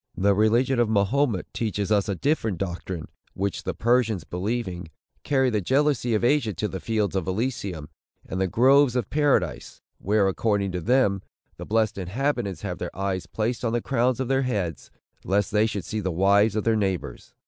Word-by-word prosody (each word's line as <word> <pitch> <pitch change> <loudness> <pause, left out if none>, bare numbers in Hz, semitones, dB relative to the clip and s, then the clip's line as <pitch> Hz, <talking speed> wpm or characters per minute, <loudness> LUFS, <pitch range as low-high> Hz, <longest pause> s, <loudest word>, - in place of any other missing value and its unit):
The 100 +1 +3
religion 120 +5 +2
of 120 -2 +2
Mahomet 110 +1 +1
teaches 105 -2 -2
us 105 0 +2
a 100 - 0
different 115 - 0
doctrine, 90 -2 -5 0.3
which 100 +1 -3
the 95 - -2
Persians 115 -2 +1
believing, 90 -2 -4 0.3
carry 135 -3 +2
the 105 -2 0
jealousy 130 0 +1
of 105 - 0
Asia 120 -5 +2
to 105 - -1
the 95 -2 -5
fields 105 -3 -1
of 95 -3 -1
Elysium, 95 - -3 0.4
and 95 - -4
the 95 - +2
groves 130 +5 +4
of 125 - -2
Paradise; 135 - 0 0.2
where, 100 0 +2
according 100 0 0
to 90 0 -3
them, 105 -2 +2 0.4
the - - -7
blessed 110 -2 +1
inhabitants 105 +1 -2
have 90 -3 -4
their - - -6
eyes 95 -2 -2
placed 115 +3 -2
on 115 -1 0
the 120 - +2
crown 125 0 +1
of 130 - -2
their 135 +1 +2
heads, 100 -10 -3 0.3
lest 100 +1 0
they 105 +1 +3
should 100 -6 -4
see 110 - -3
the 95 - -2
wives 100 +4 +3
of 110 - 0
their 115 -1 +2
neighbors. 95 - -3
105 Hz, 185 wpm, -25 LUFS, 95-120 Hz, 0.4 s, groves